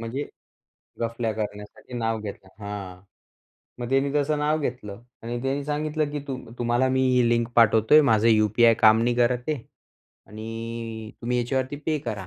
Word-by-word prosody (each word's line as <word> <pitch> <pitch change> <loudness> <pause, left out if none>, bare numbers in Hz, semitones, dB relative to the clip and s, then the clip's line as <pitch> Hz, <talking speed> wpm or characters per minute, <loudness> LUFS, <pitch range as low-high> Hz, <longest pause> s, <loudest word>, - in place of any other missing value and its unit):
म्हणजे 120 +5 -4 0.7
गफल्या 115 -1 -2
करण्यासाठी 105 +2 -7
नाव 115 -1 -1
घेतलं 100 -2 -8 0.2
हां. 95 -3 -7 0.8
मग 120 0 -4
त्यांनी 135 +1 +1
तसं 150 +1 +1
नाव 150 +1 +1
घेतलं 115 -6 -5 0.2
आणि 120 +1 -4
त्यांनी 135 +2 -1
सांगितलं 150 0 -1
की 150 - -3
तू 135 -2 -3 0.2
तुम्हाला 120 +2 +2
मी 130 0 +1
ही 125 -1 +4
लिंक 115 0 +2
पाठवतोय, 115 +5 +6
माझं 110 -4 +3
यू-पी-आय 110 +1 +5
काम 110 0 +5
नाही 120 0 +1
करत 125 +2 +1
आहे 155 - 0 0.7
आणि 115 +1 -6
तुम्ही 125 +1 -1
याच्यावरती 130 +3 -1
पे 155 -1 +1
करा. 100 -4 -4
120 Hz, 155 wpm, -25 LUFS, 110-135 Hz, 0.8 s, पाठवतोय